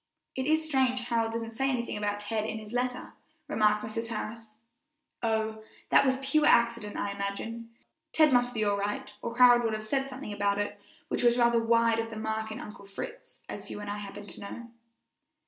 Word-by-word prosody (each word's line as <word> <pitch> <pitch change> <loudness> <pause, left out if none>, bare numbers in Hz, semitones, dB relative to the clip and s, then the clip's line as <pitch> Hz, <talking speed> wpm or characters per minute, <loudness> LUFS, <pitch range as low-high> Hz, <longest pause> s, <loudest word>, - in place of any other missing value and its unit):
"It 260 0 -2
is 315 +1 +3
strange 260 -4 +2
Harold 230 -2 0
didn't 230 0 -3
say 270 +4 0
anything 245 -3 -1
about 205 0 -2
Ted 215 +1 -1
in 220 0 -3
his 215 +1 -9
letter," 250 0 -2 0.3
remarked 210 -1 +2
Mrs. 225 +1 -4
Harris. 225 -1 -6 0.6
"Oh, 220 -1 0 0.3
that 275 - +6
was 260 0 +3
pure 275 +3 +2
accident, 235 -3 +3
I 200 - -1
imagine! 200 +4 -4 0.4
Ted 310 -3 +5
must 245 0 +3
be 215 - +1
all 205 -1 +2
right, 205 +1 -3
or 235 0 -5
Harold 245 -1 +8
would 225 -1 0
have 215 0 -4
said 270 +4 0
something 260 -5 -6
about 200 0 +1
it 205 0 -3 0.3
which - - -1
was 240 0 +4
rather 235 -1 +4
wide 230 0 +3
of 225 0 -2
the 225 - -7
mark 220 0 -2
in 215 - -5
'Uncle 205 -1 -10
Fritz,' 455 - -8
as - - -7
you - - -6
and 205 0 -5
I 205 - -4
happen 205 0 -8
to - - -8
know." 235 +4 -8
225 Hz, 200 wpm, -29 LUFS, 210-245 Hz, 0.6 s, Harold